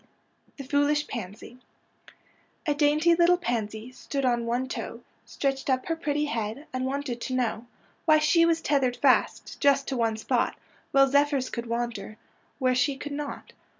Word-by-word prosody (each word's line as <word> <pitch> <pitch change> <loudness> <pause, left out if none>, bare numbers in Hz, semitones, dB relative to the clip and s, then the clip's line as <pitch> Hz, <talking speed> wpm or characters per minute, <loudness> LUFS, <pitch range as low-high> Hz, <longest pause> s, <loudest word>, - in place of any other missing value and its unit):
THE 275 - -6
FOOLISH 290 +2 +1
PANSY 230 +2 -8 1.1
A 300 - +2
dainty 300 +3 +3
little 345 +1 +4
pansy 225 -5 -3
Stood 275 +1 -4
on 240 -2 +1
one 245 +2 -1
toe, - - -6 0.3
Stretched 270 0 -2
up 255 -1 +1
her 330 - -1
pretty 300 -2 -1
head, 230 0 -3
And 255 0 -1
wanted 265 -3 -3
to 255 - -3
know 240 -2 -1 0.4
Why 310 -1 +6
she 310 +2 +4
was 330 -1 +2
tethered 265 -5 +1
fast, - - +1
Just 280 -1 +3
to 270 - -2
one 225 -2 0
spot, 220 - 0 0.3
While 275 0 +5
zephyrs 280 -1 +2
could 235 -1 -4
wander 235 -2 -4 0.4
Where 255 -2 +2
she 265 +2 +1
could 290 +1 -7
not. 290 0 -6
270 Hz, 160 wpm, -27 LUFS, 240-295 Hz, 1.1 s, Why